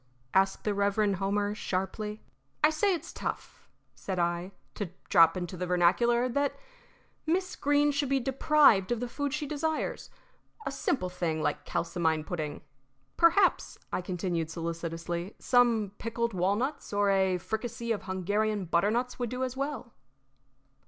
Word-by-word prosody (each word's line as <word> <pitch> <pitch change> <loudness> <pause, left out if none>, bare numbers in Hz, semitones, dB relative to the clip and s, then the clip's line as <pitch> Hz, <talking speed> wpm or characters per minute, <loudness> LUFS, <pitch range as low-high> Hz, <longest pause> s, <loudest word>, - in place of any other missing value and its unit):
asked 195 0 +2
the 210 - 0
Reverend 200 0 +1
Homer, 205 +2 0
sharply. 210 +2 -3 0.4
"I 305 - +6
say 370 +5 +2
it's 335 - -8
tough," - - -6 0.2
said 190 -2 -5
I, 175 +2 -1 0.2
"to 205 - -3 0.2
drop 165 -1 +6
into 175 0 -4
the 180 0 -3
vernacular, 235 +8 +3
that 280 +3 0 0.7
Miss 365 +3 0
Greene 290 +1 +3
should 285 -1 -1
be 275 0 +3
deprived 265 -5 +4
of 240 - +1
the 245 - -2
food 285 +3 -3
she 300 +1 -2
desires 305 +2 -2 0.6
a - - -2
simple 265 -7 -1
thing 170 -3 -2
like 150 - -1
kalsomine 160 -2 0
pudding. 155 -3 -4 0.5
Perhaps," 345 +3 +3 0.2
I - - 0
continued, 175 -3 -2
solicitously, 170 +2 -4
"some 235 -5 +3
pickled 230 0 -2
walnuts 205 +11 -1
or 205 -1 +2
a 190 -1 +2
fricassee 230 +4 -4
of 210 -4 -2
Hungarian 205 +2 -1
butternuts 215 +10 +1
would 245 -2 -1
do 250 +2 -3
as 255 0 -3
well." 275 -3 -4
205 Hz, 145 wpm, -29 LUFS, 180-255 Hz, 0.7 s, I